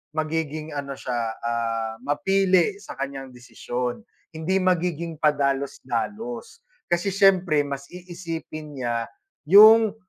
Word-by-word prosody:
magiging 155 Hz, -1 st, -2 dB
ano 140 Hz, -1 st, -4 dB
siya, 125 Hz, -2 st, -4 dB, 0.3 s
ah, 115 Hz, -1 st, -2 dB
mapili 185 Hz, +6 st, +2 dB
sa 200 Hz, -, -10 dB
kaniyang 135 Hz, -1 st, -6 dB
desisyon, 125 Hz, -, -5 dB, 0.3 s
hindi 185 Hz, +4 st, 0 dB
magiging 170 Hz, -3 st, 0 dB
padalos-dalos. 145 Hz, -, -2 dB, 0.2 s
Kasi 175 Hz, +2 st, 0 dB
siyempre 185 Hz, -6 st, +3 dB
mas 140 Hz, -1 st, -6 dB
iisipin 165 Hz, -4 st, -8 dB
niya 120 Hz, -2 st, -2 dB, 0.4 s
'yong 215 Hz, +2 st, +8 dB
155 Hz, 100 wpm, -24 LUFS, 135-185 Hz, 0.4 s, yong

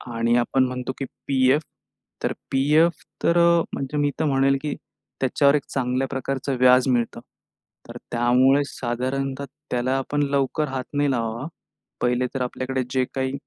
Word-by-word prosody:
आणि 115 Hz, +1 st, +2 dB
आपण 130 Hz, +2 st, +2 dB
म्हणतो 125 Hz, 0 st, -4 dB
की 135 Hz, -, -2 dB, 0.2 s
पी-एफ 135 Hz, +2 st, +3 dB, 0.6 s
तर -, -, 0 dB, 0.2 s
पी-एफ 150 Hz, +5 st, +3 dB, 0.2 s
तर 170 Hz, -, +3 dB
अ, 170 Hz, 0 st, +5 dB
म्हणजे 140 Hz, +2 st, -3 dB
मी 145 Hz, -1 st, +2 dB
तर -, -, +1 dB
म्हणेल 135 Hz, -1 st, +3 dB
की 150 Hz, 0 st, -3 dB, 0.5 s
त्याच्यावर 140 Hz, +2 st, +3 dB
1 145 Hz, -, 0 dB
चांगल्या 130 Hz, 0 st, 0 dB
प्रकारचं 135 Hz, 0 st, -3 dB
व्याज 125 Hz, +1 st, +5 dB
मिळतं. 120 Hz, -2 st, 0 dB, 0.7 s
तर -, -, -7 dB
त्यामुळे 125 Hz, +4 st, +4 dB
साधारणतः 130 Hz, +2 st, -3 dB, 0.3 s
त्याला 125 Hz, +1 st, 0 dB
आपण 145 Hz, +2 st, -1 dB
लवकर 140 Hz, +2 st, 0 dB
हात 130 Hz, -1 st, -3 dB
नाही 145 Hz, -1 st, +2 dB
लावावा. 115 Hz, 0 st, -2 dB, 0.6 s
1ले 125 Hz, +1 st, +1 dB
तर 135 Hz, -, -3 dB
आपल्याकडे 130 Hz, +1 st, -2 dB
जे 130 Hz, -1 st, +1 dB
काही 130 Hz, 0 st, -1 dB
130 Hz, 150 wpm, -23 LUFS, 125-140 Hz, 0.7 s, अ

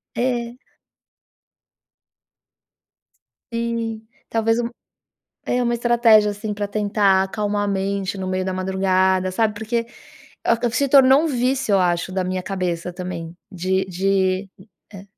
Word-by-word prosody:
É. 240 Hz, -1 st, -1 dB, 3.0 s
Sim. 230 Hz, -1 st, -3 dB, 0.2 s
Talvez 225 Hz, 0 st, +1 dB
um 235 Hz, -, -3 dB, 0.8 s
é, 250 Hz, 0 st, +1 dB
uma 240 Hz, 0 st, +1 dB
estratégia, 235 Hz, -3 st, +4 dB
assim, 205 Hz, +1 st, -5 dB
pra 205 Hz, 0 st, -3 dB
tentar 205 Hz, -2 st, +2 dB
acalmar 205 Hz, +1 st, -2 dB
a -, -, -1 dB
mente 195 Hz, 0 st, -2 dB
no 190 Hz, -, -4 dB
meio 185 Hz, 0 st, -1 dB
da 190 Hz, -, -2 dB
madrugada, 185 Hz, 0 st, +1 dB
sabe, 215 Hz, +2 st, +1 dB
porque 230 Hz, +2 st, -2 dB, 0.6 s
acab 235 Hz, 0 st, +1 dB
se 280 Hz, -, +1 dB
tornou 270 Hz, +1 st, +6 dB
um -, -, 0 dB
vício, 255 Hz, -4 st, 0 dB
eu -, -, +5 dB
acho, 175 Hz, 0 st, 0 dB
da 185 Hz, 0 st, -1 dB
minha 185 Hz, 0 st, -2 dB
cabeça 180 Hz, -2 st, -3 dB
também. 175 Hz, -2 st, -6 dB, 0.2 s
De 190 Hz, 0 st, -1 dB
de 190 Hz, +1 st, 0 dB, 0.4 s
é. 195 Hz, 0 st, -10 dB
205 Hz, 130 wpm, -21 LUFS, 185-230 Hz, 3.0 s, tornou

